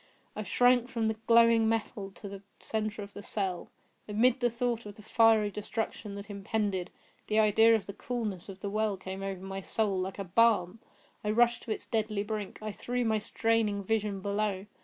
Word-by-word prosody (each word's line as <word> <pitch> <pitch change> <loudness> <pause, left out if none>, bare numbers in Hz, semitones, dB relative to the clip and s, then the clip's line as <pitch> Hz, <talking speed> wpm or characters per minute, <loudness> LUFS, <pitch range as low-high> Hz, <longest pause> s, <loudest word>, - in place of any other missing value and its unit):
I - - -3
shrank 245 +4 +3
from 230 -4 -1
the 220 - -2
glowing 230 -1 +6
metal 215 -3 -2
to 205 - -9
the 195 -1 -8 0.2
centre 215 -1 -3
of 200 - -11
the - - -8
cell. 190 -4 -2 0.4
Amid 235 +5 +3
the 245 -1 +2
thought 235 -1 -2
of 205 - -9
the 215 - -14
fiery 220 -2 +4
destruction 210 0 -4
that 200 0 -7
impended, 200 -2 -2 0.4
the 215 - 0
idea 220 +2 +6
of 220 - -2
the 200 - -7
coolness 210 -5 -4
of 195 -1 -9
the 200 - -3
well 215 -1 0
came 190 +1 -6
over 195 -1 -4
my 195 0 -5
soul 200 -1 0
like 190 +1 -3 0.2
balm. 225 -3 +4 0.4
I 210 - -1
rushed 235 +2 +3
to 225 - -4
its - - -3
deadly 215 -2 -1
brink. 210 -2 -4
I 215 - -3
threw 245 +4 -2
my 220 -1 +2
straining 220 -2 0
vision 210 -1 -1
below. 200 -1 -1
215 Hz, 190 wpm, -30 LUFS, 200-225 Hz, 0.4 s, glowing